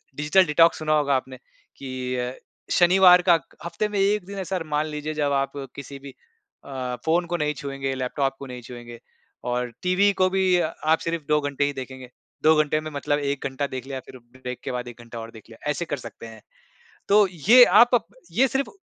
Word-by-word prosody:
Digital 150 +6 +3
detox 165 +2 +4
सुना 155 0 0
होगा 145 -2 +2
आपने 130 0 -4 0.4
कि 130 -1 -5
अ, 125 +1 -3 0.4
शनिवार 180 0 +6
का - - +8 0.3
हफ़्ते 175 +5 -2
में 205 -1 -2
1 200 0 +1
दिन 200 +1 -8
ऐसा 190 0 -2
र 165 - -4
मान 150 0 0
लीजिए 150 0 -5
जब 145 -2 0
आप 135 0 0 0.2
किसी 140 0 -8
भी 140 0 -10 0.5
अ, 130 -2 -4
फ़ोन 170 +2 +2
को 175 0 -2
नहीं 150 -1 0
छुएँगे, 135 -1 -4
लैपटॉप 135 +1 -2
को 140 - -7
नहीं 125 -1 -8
छुएँगे 120 -1 -10 0.5
और 125 0 -2
टीवी 185 +3 +3
को 185 - +4
भी 185 -1 +2
आप 160 0 0
सिर्फ़ 165 -2 -2
2 150 - +4
घंटे 145 0 -1
ही 145 - -2
देखेंगे। 130 -1 -8 0.3
2 155 +1 +6
घंटे 155 +1 -1
में 155 0 -7
मतलब 145 0 -1
1 140 -1 -3
घंटा 140 +1 -3
देख 130 -1 -6
लिया 135 -1 -5
फ़िर 130 - -11 0.2
ब्रेक 125 -1 -6
के - - -4
बाद 125 0 -4
1 120 0 -10
घंटा 115 0 -9
और 115 0 -8
देख 110 - -14
लिया, 115 +6 -7
ऐसे 170 +3 -3
कर 145 - -3
सकते 115 -2 -10
हैं। 110 -1 -13 0.7
तो 205 0 +6 0.2
ये 245 +1 +10
आप 240 +1 +5
अब 230 -7 +3 0.3
ये 260 +8 +3
सिर्फ़ 270 +2 -2
145 Hz, 215 wpm, -24 LUFS, 130-175 Hz, 0.7 s, ये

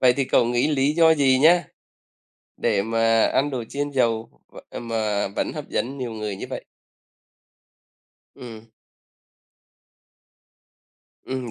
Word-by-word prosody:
vậy 125 -1 +5
thì 135 +2 -1
cậu 125 - +3
nghĩ 120 +4 +1
lý 145 -1 +1
do 160 0 +5
gì 135 -3 +3
nha 170 +4 +5 0.9
để 105 -4 +1
mà 115 0 +2
ăn 145 +2 +1
đồ 130 -4 -4
chiên 145 +1 -3
dầu 115 -4 0 0.2
v - - -18
ờ, - - -7
mà 110 -3 -1
vẫn - - -1
hấp - - -7
dẫn 135 +4 -3
nhiều 125 -3 -4
người 105 -2 -4
như - - -7
vậy? - - -6 1.7
Ừm. 115 -3 -11 2.6
Ừm, 130 -2 -5
125 Hz, 135 wpm, -23 LUFS, 115-140 Hz, 2.6 s, vậy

